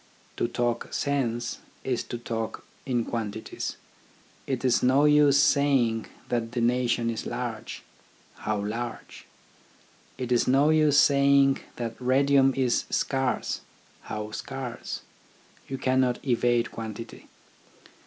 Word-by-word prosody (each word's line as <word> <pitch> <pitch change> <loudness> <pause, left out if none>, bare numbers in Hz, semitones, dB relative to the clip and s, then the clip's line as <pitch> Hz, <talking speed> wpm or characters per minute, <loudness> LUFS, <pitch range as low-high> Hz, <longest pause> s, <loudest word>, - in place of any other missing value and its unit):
To - - +1
talk 120 0 -2
sense, 120 -4 -1 0.2
is 125 -2 -1
to 120 - -5
talk 115 -1 -4 0.2
in 120 -3 0
quantities. 110 -2 -4 0.7
It 130 -1 -2
is 125 - +3
no 135 +3 +4
use 150 -1 +5
saying 140 -6 +3 0.2
that 115 -1 -1
the 125 - -1
nation 120 -1 +1
is 115 - -5
large, 120 -2 -5 0.3
— - - -31
How 105 -1 0
large? 115 +2 -6 0.9
It 125 -1 -4
is 120 - +3
no 140 +4 +4
use 155 -2 +4
saying 140 -1 +5 0.2
that 115 -2 -4
radium 135 +1 +4
is 125 -3 +1
scarce, 135 -3 -1 0.2
— - - -31
How 105 0 -4
scarce? 130 +1 -5 0.7
You 135 - -4
cannot 130 -1 +2
evade 120 -1 +2
quantity. 115 0 -8
125 Hz, 125 wpm, -27 LUFS, 115-135 Hz, 0.9 s, use